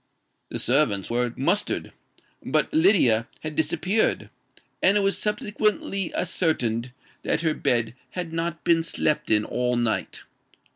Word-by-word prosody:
The - - -4
servants 120 -7 +1
were 120 0 +1
mustered; 175 +10 0 0.5
but - - 0
Lydia 125 - +4
had 155 0 -5
disappeared; 180 +7 0 0.5
and 195 +2 +4
it - - +2
was 195 0 +1
subsequently 210 -2 -1
ascertained 130 -10 0 0.3
that - - -1
her 160 -2 +1
bed 120 -5 0 0.2
had 175 -3 -5
not 165 0 -3
been 165 -1 +3
slept 155 -1 -1
in 105 -1 +3
all 125 0 0
night. 120 -2 -2
160 Hz, 130 wpm, -24 LUFS, 120-185 Hz, 0.5 s, Lydia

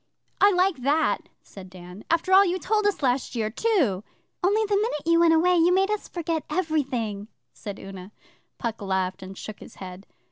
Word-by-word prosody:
'I 405 0 +6
like 365 -2 +2
that!' 285 +5 0
said 190 -2 -12
Dan. 180 +2 -12
'After 335 +3 +1
all 390 +1 +8
you 365 -1 0
told 425 +3 +1
us 405 -7 -1
last 255 0 0
year, 220 -2 -1
too!' 260 - +1 0.4
'Only, 420 +4 +3
the 410 -1 0
minute 400 -8 -1
you 335 0 +4
went 335 -1 +5
away, 355 +2 +3
you 340 +1 +4
made 385 +2 +2
us 425 - -3
forget 330 -2 -3
everything,' 260 - -2 0.3
said 205 -2 -8
Una. 195 0 -10 0.5
Puck 230 -2 -4
laughed 190 -1 -2
and 190 +1 -9
shook 215 - -8
his - - -13
head. 185 +1 -10
300 Hz, 185 wpm, -25 LUFS, -, 0.5 s, all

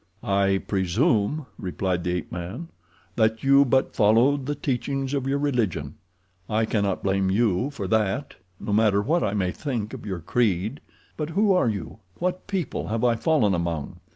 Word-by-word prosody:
"I 100 -3 +1
presume," 105 - +1
replied 90 -1 -2
the 90 - -1
ape 90 - -5
man, 95 - -6 0.5
"that 110 -1 +2
you 140 +1 +6
but 130 0 +1
followed 125 +6 +3
the 145 - -1
teachings 135 0 -2
of 135 -2 -1
your 140 +1 +1
religion. 115 - -1 0.6
I 110 +1 +1
cannot 100 -3 -1
blame 95 -1 +1
YOU 110 +4 +1
for 115 -10 -5
that, 110 +5 0 0.3
no 105 - -3
matter 105 -1 +3
what 165 +8 +1
I 105 0 0
may 95 -3 0
think 120 -6 -4
of - - -8
your 95 -3 -3
creed. 105 - 0 0.4
But 150 0 -3
who 200 +4 +3
are 180 -10 +3
you—what 110 - -5
people 190 -9 -3
have 110 +2 -2
I 120 -1 +4
fallen 115 -4 +2
among?" 85 -2 -3
110 Hz, 165 wpm, -25 LUFS, 95-140 Hz, 0.6 s, you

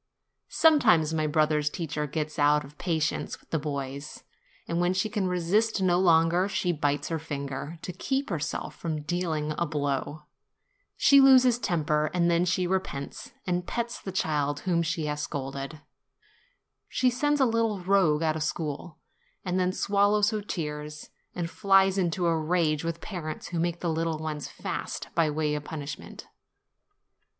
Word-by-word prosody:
Sometimes 220 - +4
my 155 -1 +1
brother's 150 -1 +2
teacher 150 -2 -3
gets 155 +2 -3
out 150 0 +4
of 145 +2 -15
pa 170 -3 0
tience 155 0 -2
with - - -28
the 160 - +1
boys; 140 -1 -5 0.4
and 170 +1 0
when 175 +1 +1
she 195 +3 0
can 205 -4 0
resist 185 +6 +1
no 180 -2 +3
longer, 170 +1 +4
she 180 -2 0
bites 145 -3 -1
her 165 -1 -1
finger, 145 +1 -5
to 180 - -5
keep 270 +7 -2
herself 150 -3 -3
from 155 -3 -4
dealing 160 -3 -1
a 170 - +1
blow; 145 0 -2 0.7
she 280 -1 +7
loses 255 -3 +6
temper, 155 -6 0
and 170 -1 +3
then 170 +1 +3
she 180 0 +1
repents, 175 -7 -3
and 180 -1 -1
pets 235 0 -3
the 190 - -5
child 145 -5 0
whom 175 -3 +1
she 165 -1 -1
has 150 0 -2
scolded; 140 +2 -5 1.1
she 255 -1 +2
sends 290 +4 +1
a 265 - +5
little 225 -4 0
rogue 175 -5 +3
out 155 -1 +1
of 160 - -3
school, 150 +1 -3 0.5
and 185 0 0
then 180 0 +2
swallows 205 +2 +2
her 215 -1 -2
tears, 150 -5 -5 0.2
and 175 -2 -2
flies 195 +2 +3
into 175 0 0
a 165 -1 +3
rage 155 -1 +1
with 165 0 -3
parents 160 -6 -6
who 170 - -2
make 170 0 -1
the 175 - -1
little 165 0 0
ones 155 -2 -4
fast - - -5
by 165 -2 +2
way 150 0 0
of 150 -1 -3
punishment. 150 -1 -7
165 Hz, 165 wpm, -27 LUFS, 150-185 Hz, 1.1 s, she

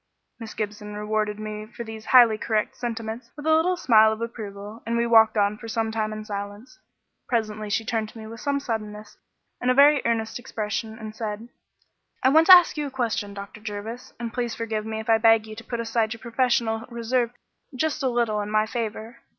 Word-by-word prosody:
Miss 225 -1 -8
Gibson 210 0 -5
rewarded 210 0 -1
me 215 0 -6
for 235 +1 -8
these 220 -1 -9
highly 240 -4 +7
correct 215 0 -1
sentiments 230 0 -5
with 295 - -8
a 315 - +4
little 355 +3 +2
smile 220 -8 +5
of 220 - -4
approval, 215 -2 -7
and 235 0 -1
we 235 - +2
walked 225 -2 +5
on 205 +1 +1
for 230 - -9
some 225 0 -1
time 215 -1 -2
in 215 0 -6
silence. 205 - -7 0.5
Presently 215 -3 -2
she 220 +2 0
turned 220 -2 -1
to 225 - -14
me 220 - -8
with 225 +1 -9
some 280 +4 -1
suddenness 215 -4 -5 0.5
and 250 - +1
a 255 - +4
very 285 0 +6
earnest 230 0 -1
expression, 220 -1 -4
and 215 -1 -8
said 220 +1 -5 0.7
"I 260 - +6
want 320 +4 +5
to 370 - +13
ask 355 -3 +4
you 295 -1 -1
a - - -5
question, 230 -6 -2
Dr. 200 +1 -9
Jervis, 220 +3 -7
and 235 -1 -5
please 240 -2 -2
forgive 220 -2 -3
me 220 0 -3
if 220 - -7
I 225 -1 +4
beg 225 -1 +5
you 215 0 -9
to 225 - -9
put 235 0 -5
aside 225 -1 0
your 225 - -11
professional 235 -2 0
reserve 235 0 0 0.5
just 310 +3 -1
a 265 - +1
little 235 -3 0
in 205 - -5
my 215 0 +2
favour. 225 +1 -5
225 Hz, 210 wpm, -25 LUFS, 215-235 Hz, 0.7 s, to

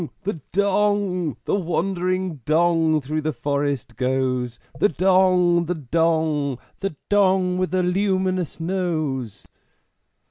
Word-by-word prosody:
the 185 -5 -3
Dong! 200 - +1
The - - -1
wandering 185 -1 -1
Dong 160 +2 +2
through 155 +3 -3
the 155 +1 -1
forest 140 -5 -2
goes! 125 -2 -1 0.2
The 205 - +4
Dong! 180 0 +3
the 180 - -1
Dong! 155 -2 0 0.2
The 195 -5 -3
Dong 190 -3 +2
with 185 - -1
a 185 - +2
luminous 185 -2 0
Nose!" 155 - -2
170 Hz, 110 wpm, -22 LUFS, 145-185 Hz, 0.2 s, The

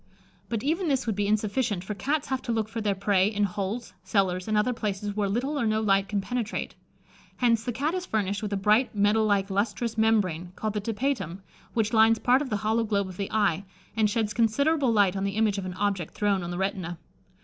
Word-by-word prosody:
But 225 -2 -2
even 330 +6 0
this 270 -3 +1
would 220 -3 -1
be 205 0 0
insufficient, 210 -1 0
for 210 - -4
Cats 280 +9 -2
have 265 -1 -1
to 240 - -3
look 220 -2 0
for 225 +1 -5
their 205 -2 0
prey 195 -1 +2
in 210 -1 0
holes, 205 +4 -3
cellars, 190 -1 0
and 215 -1 +1
other 250 +4 +2
places 205 -2 -3
where 205 -2 0
little 265 +8 -1
or 235 - +1
no 215 0 +1
light 195 -2 +2
can 205 -1 0
penetrate. 235 0 -3 0.6
Hence, 230 -3 +2
the 245 - -2
Cat 285 +7 -1
is 370 0 -3
furnished 200 -2 -1
with 210 -2 -4
a 200 - 0
bright 210 +5 +2
metal 210 +2 +3
like, 200 -1 +1
lustrous, 220 +3 -1
membrane, 185 -6 +1
called 215 -1 -3
the 210 - -2
Tapetum, 220 - -2 0.3
which 220 -1 +1
lines 225 0 +5
part 250 +4 +3
of 285 - -3
the 210 - 0
hollow 225 +2 +2
globe 200 -3 0
of 180 - -10
the 200 - -3
eye, 200 -4 +1 0.3
and 215 -2 +3
sheds 210 -1 -1
considerable 270 +5 +2
light 200 -4 +3
on 195 - -2
the 200 0 -2
image 215 -2 +2
of 185 - -5
an 180 - -6
object 195 -4 -2
thrown 205 -2 +1
on 175 - -5
the 175 - -4
retina. 190 -3 -2
210 Hz, 225 wpm, -27 LUFS, 195-230 Hz, 0.6 s, lines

